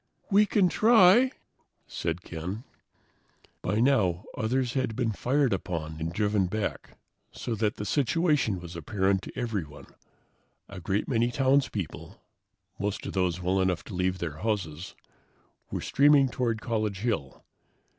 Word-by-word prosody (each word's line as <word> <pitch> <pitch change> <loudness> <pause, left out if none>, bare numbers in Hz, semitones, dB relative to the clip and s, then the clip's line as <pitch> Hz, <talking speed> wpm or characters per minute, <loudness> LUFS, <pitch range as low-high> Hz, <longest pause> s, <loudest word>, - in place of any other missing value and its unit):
"We 205 +2 +5
can 200 -3 +3
try," 220 +4 +6 0.6
said 85 +1 -4
Ken. 90 +7 -6 1.0
By 105 +4 0
now, 110 -9 +2
others 125 +2 0
had 130 -5 -1
been 120 -2 0
fired 130 +3 +1
upon 80 -4 -4
and 80 +1 -3
driven 105 0 +1
back, 105 +2 -4 0.3
so 120 - -4
that 110 -1 0
the 105 - -5
situation 145 - +1
was 85 0 -9
apparent 95 +3 0
to - - -10
everyone. 85 - -4 0.8
A 95 - -9
great 95 +4 -1
many 120 -2 +1
townspeople, 130 - -1 0.6
most 105 +1 -3
of - - -5
those 90 -2 0
well 95 +2 +1
enough 95 -2 0
to - - -10
leave 90 0 0
their 85 -4 -5
houses, 90 -5 -3 0.7
were - - -3
streaming 140 -1 +4
toward 115 -2 -1
College 110 -4 -2
Hill. 105 - -3
105 Hz, 135 wpm, -28 LUFS, 90-125 Hz, 1.0 s, try